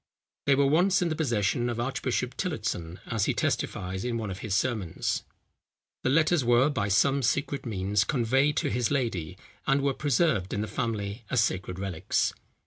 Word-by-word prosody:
They 140 - +6
were 140 +1 +3
once 180 +6 +3
in 170 - 0
the 155 - -1
possession 120 -4 0
of 120 -1 -3
Archbishop 125 0 -1
Tillotson, 105 - -3
as 115 -4 0
he - - 0
testifies 95 +1 -2
in 120 -1 -1
one 110 -3 -3
of 95 - -6
his 100 -2 -2
sermons. 105 -5 -1 0.8
The - - 0
letters 155 +1 +3
were 120 +4 +4
by 110 -7 -1
some 135 +8 +3
secret 140 +2 -1
means 100 -1 +1
conveyed 135 +4 +2
to - - 0
his 120 +1 +1
lady, 95 - -2 0.3
and 135 0 +3
were 140 -1 +2
preserved 140 - +1
in 100 - -1
the 110 - -2
family 110 -1 -3
as 120 -3 +3
sacred 90 -3 -2
relics. 95 -4 -1
120 Hz, 175 wpm, -28 LUFS, 100-140 Hz, 0.8 s, They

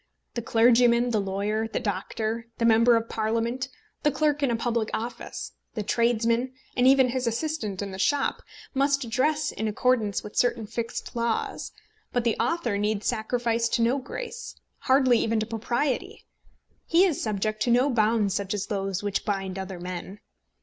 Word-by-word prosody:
The 235 - -3
clergyman, 235 +1 +4
the 215 -3 +2
lawyer, 205 +3 -1
the 225 - -2
doctor, 220 +3 -3
the 230 - +1
member 230 +1 +6
of 230 0 -2
Parliament, 230 +4 -1 0.3
the 295 - +3
clerk 295 +1 +1
in 280 - +2
a 235 - +1
public 230 -1 -1
office, 235 +2 -5 0.2
the 215 - -2
tradesman, 235 +3 +1 0.2
and 250 0 +4
even 265 -1 +6
his 250 0 -1
assistant 230 -6 -2
in 200 - -5
the 190 - -7
shop, 285 +7 +1 0.3
must 275 -3 +1
dress 300 +5 +1
in 220 - -3
accordance 215 -1 +1
with 210 - -9
certain 240 -2 +1
fixed 230 +2 -5
laws; 235 -1 -2 0.4
but 245 - 0
the 230 -2 +2
author 240 -4 0
need 210 0 0
sacrifice 235 0 0
to 230 - +1
no 250 +4 +2
grace, 480 - -7 0.2
hardly 260 -3 +4
even 225 0 +1
to 215 - -1
Propriety. 250 - -2 0.6
He 345 +3 +5
is 335 -7 0
subject 215 0 -2
to - - +1
no 245 +3 +4
bonds 215 -3 +2
such 200 +1 -2
as 205 0 -2
those 195 -2 -2
which 205 -1 -1
bind 195 -2 -2
other 190 -1 -6
men. 180 +3 -6
230 Hz, 170 wpm, -26 LUFS, 215-250 Hz, 0.6 s, member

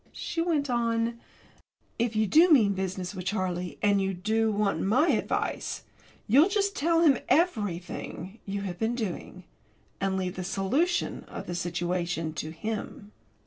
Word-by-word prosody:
She 330 - -3
went 320 -4 +1
on: 235 -1 0 0.8
"If 235 -1 0
you 215 0 +3
do 325 - +6
mean 225 -10 +6
business 185 0 -3
with 185 -2 -6
Charlie, 180 -3 -2
and 200 -1 +4
you 190 0 -1
do 220 +4 +1
want 205 -1 0
my 255 - +3
advice, - - -1 0.4
you'll 280 - +6
just 400 0 0
tell 330 +3 +2
him 285 -7 +5
everything 205 - -1
you 200 +1 -2
have 180 -3 -5
been 225 +2 0
doing, 185 -4 -5 0.6
and 195 -1 0
leave 185 -1 -3
the 185 - -3
solution 230 - 0
of - - -8
the 175 - -5
situation 175 -1 -2
to 155 0 -4
him." 205 +4 -5
205 Hz, 150 wpm, -28 LUFS, 185-240 Hz, 0.8 s, do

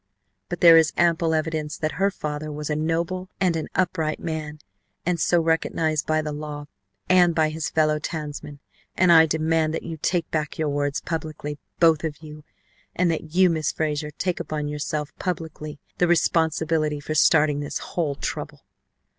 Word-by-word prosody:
But 175 - -5
there 165 -1 +9
is 160 -1 +4
ample 165 -1 +2
evidence 155 -1 -2
that 155 0 -1
her 200 - +4
father 150 -4 -5
was 150 0 -4
a - - +1
noble 170 +4 -1
and 185 -3 +2
an 160 - -3
upright 165 -4 0
man 155 -2 -4 0.5
and 175 -1 0
so 175 +2 +3
recognized 160 -1 0
by 155 0 +1
the 150 - -3
law 150 0 -6 0.4
and 175 -2 +5
by 155 -1 +3
his 155 0 -3
fellow 155 -1 +2
townsmen, 150 -2 -6 0.4
and 185 -1 +5
I 160 -1 +8
demand 160 0 +1
that - - -4
you 165 -1 -6
take 170 +2 0
back 155 -2 -2
your 155 -2 0
words 145 0 -1
publicly, 155 -2 -5 0.2
both 165 -2 +4
of 155 -3 -3
you, 150 -1 -10 0.5
and 180 -1 +2
that 160 0 -5
you, 185 0 +6
Miss 160 -3 0
Frazer, 150 -1 -2
take 175 +4 -2
upon 150 -1 -3
yourself 150 0 -3
publicly 160 -4 -4 0.2
the 180 - +4
responsibility 160 -2 +1
for 145 +2 -4
starting 150 -1 +4
this 145 - -3 0.2
whole 155 -5 0
trouble. - - -5
155 Hz, 170 wpm, -24 LUFS, 150-165 Hz, 0.5 s, there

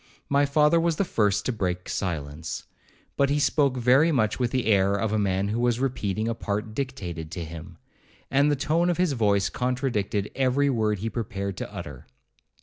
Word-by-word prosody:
My 140 0 +3
father 150 +3 +4
was 165 -1 +1
the 200 - 0
first 105 - +1
to - - +1
break 90 -5 -3
silence, 80 -4 -4 0.5
but 140 -1 +3
he 145 - +2
spoke 140 -2 +2
very 130 +7 +4
much 110 -7 +1
with 125 -2 +1
the 130 0 -1
air 100 -2 +3
of 105 +1 -1
a 110 - +2
man 100 0 0
who 110 +3 -1
was 120 -1 +1
repeating 110 -5 -1
a 115 - 0
part 105 0 -3
dictated 95 - -4
to 85 -2 -4
him; 80 0 -9 0.5
and 140 +2 +4
the 145 - +2
tone 165 +5 +1
of 175 - 0
his 180 -3 +2
voice 100 -5 +2
contradicted 125 -6 -1
every 135 +2 +2
word 110 -4 +1
he 110 +4 -3
prepared 100 -4 -4
to - - -5
utter. - - -8
115 Hz, 190 wpm, -26 LUFS, 100-135 Hz, 0.5 s, father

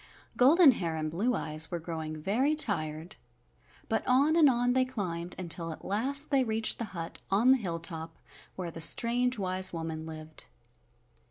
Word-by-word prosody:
Golden 290 +4 +6
Hair 170 -8 -3
and 155 -1 -3
Blue 220 +9 0
Eyes 155 -3 -2
were 175 - -3
growing 160 -1 -6
very 250 - 0
tired, 165 - -1 0.7
but 220 - 0
on 280 +5 +3
and 315 -4 +6
on 245 0 +1
they 260 0 +3
climbed 180 -9 -5
until 165 -2 -4
at 155 - -10
last 275 +10 0
they 270 -2 +3
reached 220 -1 +2
the 230 - -2
hut 165 0 -6
on 220 +7 +4
the 265 - +5
hilltop 165 -5 -4 0.4
where 175 -3 -5
the 165 - -7
strange, 240 - +3
wise 185 -1 +1
woman 160 -1 -5
lived. 155 0 -4
185 Hz, 165 wpm, -29 LUFS, 165-250 Hz, 0.7 s, Golden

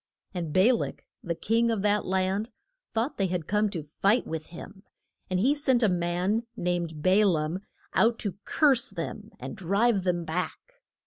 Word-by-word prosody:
And 170 -4 -3
Ba 190 +10 +5
lak, 235 - -3 0.2
the 170 -1 -2
king 230 +6 +1
of 220 -4 0
that 210 0 +2
land, 190 +4 0 0.5
thought 230 +6 0
they 195 - +2
had 175 -3 -2
come 210 +3 +1
to 170 -6 -4
fight 195 - +1
with 160 -1 -5
him, 190 +3 -10 0.5
and 185 -1 +1
he 260 +9 +4
sent 265 -5 +2
a 215 - +5
man 180 +6 0
named 170 -3 -2
Ba 190 +3 +5
laam 165 -2 +1 0.3
out 230 +1 +3
to 200 -2 -4
curse 275 -6 +3
them 205 +4 -6
and 130 +1 -6
drive 200 +4 +2
them 175 -2 -1
back. 180 - -4
195 Hz, 175 wpm, -27 LUFS, 175-225 Hz, 0.5 s, Ba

